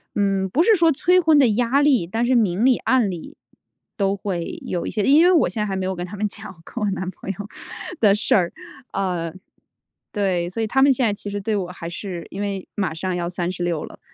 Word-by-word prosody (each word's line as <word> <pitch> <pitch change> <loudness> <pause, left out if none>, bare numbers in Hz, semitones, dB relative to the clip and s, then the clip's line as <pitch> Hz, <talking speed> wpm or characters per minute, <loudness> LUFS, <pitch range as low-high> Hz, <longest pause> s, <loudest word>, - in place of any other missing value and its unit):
嗯， 195 -2 +1
不 270 - +2
是 440 +3 +5
说 330 -3 +4
催 360 +6 +3
婚 320 -3 +4
的 265 - +6
压 245 +4 +2
力， 275 -11 +3
但 225 +6 -1
是 250 +1 +2
明 210 -1 +2
里 260 -2 +5
暗 255 -6 +2
里 175 -4 -8 0.6
都 195 -2 +1
会 185 -4 -4
有 175 - -3
一 - - -3
些 210 - -1
因 295 +7 +6
为 360 - +6
我 340 -4 +4
现 220 - -3
在 - - +1
还 195 -2 -3
没 190 -1 -2
有 190 - -2
跟 175 0 -4
他 200 - -8
们 210 +1 0
讲， 200 -4 -10
跟 240 - -5
我 210 - +1
男 185 -1 -3
朋 190 - -9
友 195 - -7 0.6
的 205 -3 +5
事 210 - +2
儿。 175 -4 +2 0.4
呃， 175 -4 -2 0.8
对， 185 -4 0
所 225 +5 -4
以 220 - 0
他 270 +5 +2
们 275 - +6
现 255 -1 +1
在 210 - +2
其 205 - -7
实 205 - -3
对 215 +2 -1
我 185 -3 -2
还 170 -2 -7
是 175 -1 -6
因 195 - -6
为 200 -2 -3
马 185 -6 -1
上 180 +3 -3
要 175 -1 -2
36 175 -2 -2
了， - - -13
200 Hz, 255 characters per minute, -22 LUFS, 180-240 Hz, 0.8 s, 的